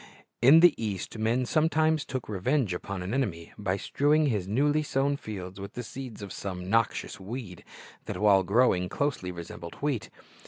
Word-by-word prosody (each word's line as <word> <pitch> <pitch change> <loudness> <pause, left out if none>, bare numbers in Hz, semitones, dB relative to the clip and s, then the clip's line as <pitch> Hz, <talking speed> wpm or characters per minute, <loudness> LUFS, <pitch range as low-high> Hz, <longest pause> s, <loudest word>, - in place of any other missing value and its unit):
In 140 +7 +8
the 175 -3 +8
East, 105 +1 -4
men 115 +3 +1
sometimes 155 +1 +2
took 130 -3 -4
revenge 110 +2 0
upon 95 +1 -5
an 95 +5 -4
enemy 95 -12 -2
by 100 -2 -1
strewing 150 +8 +2
his 105 -9 0
newly 145 +8 +2
sown 140 -1 0
fields 95 -7 -7
with 100 +1 -7
the 125 - -5
seeds 120 -2 -8
of 100 - -7
some 90 -2 -5
noxious 110 0 0
weed 100 -2 -7 0.4
that, - - -4
while 100 -2 +5
growing, 95 -2 +2
closely 140 -11 -2
resembled 85 -1 -8
wheat. 140 -6 -2
110 Hz, 165 wpm, -28 LUFS, 95-140 Hz, 0.4 s, In